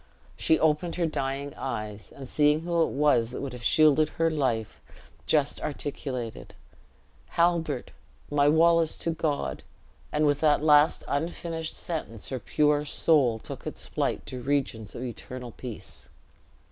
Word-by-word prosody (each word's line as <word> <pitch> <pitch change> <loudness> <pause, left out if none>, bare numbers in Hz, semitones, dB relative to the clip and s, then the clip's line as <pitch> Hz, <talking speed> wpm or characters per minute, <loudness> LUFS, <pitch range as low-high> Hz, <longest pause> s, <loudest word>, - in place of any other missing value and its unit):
She 160 - +3
opened 160 +2 +1
her 175 - +1
dying 140 -2 -3
eyes, 105 -1 -5
and 135 -2 -10
seeing 150 +3 +3
who 170 0 0
it - - +3
was 140 -6 +2
that 125 - -6
would 135 -3 -5
have 125 - -8
shielded 155 +3 +4
her 165 0 0
life, 125 -8 -1 0.5
just 150 -3 +2
articulated, 135 -5 -4 0.7
"Halbert! 170 -6 0 0.4
my 145 0 +4
Wallace 165 +1 +4
to 165 - -1
God 145 - -2 0.3
" 75 +2 -31
and 150 0 +2
with 145 -1 +2
that 150 -1 +3
last 150 0 +5
unfinished 165 +1 -3
sentence 150 - -5
her 130 - -3
pure 150 +5 +2
soul 145 -5 +3
took - - -8
its - - -5
flight - - -2
to 130 -1 -6
regions 125 -6 -2
of 120 - -5
eternal 125 0 -7
piece. 120 -1 -10
145 Hz, 145 wpm, -27 LUFS, 125-160 Hz, 0.7 s, last